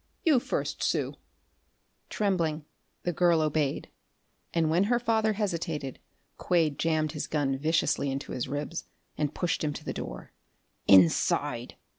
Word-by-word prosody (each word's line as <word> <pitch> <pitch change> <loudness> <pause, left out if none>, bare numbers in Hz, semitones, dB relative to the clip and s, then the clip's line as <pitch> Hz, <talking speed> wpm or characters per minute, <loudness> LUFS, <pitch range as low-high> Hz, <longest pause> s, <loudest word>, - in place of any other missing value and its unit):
You 300 -6 +5
first, - - -3
Sue." - - 0 1.0
Trembling, 165 -7 0 0.4
the 175 - -1
girl 170 0 +4
obeyed, 155 -2 0 0.6
and 165 -2 +1
when 175 +4 +3
her 240 +3 +2
father 220 -2 +1
hesitated 165 - -3 0.4
Quade 160 -5 +1
jammed 155 -2 +1
his 150 -1 -4
gun 145 -3 0
viciously 155 -1 +1
into 135 +1 -4
his 125 - -3
ribs 145 +5 -4 0.3
and 150 -1 -2
pushed 175 -3 -1
him 150 -1 0
to - - -9
the - - -3
door. - - -7 0.6
"Inside!" 95 -4 +4
160 Hz, 135 wpm, -28 LUFS, 145-175 Hz, 1.0 s, You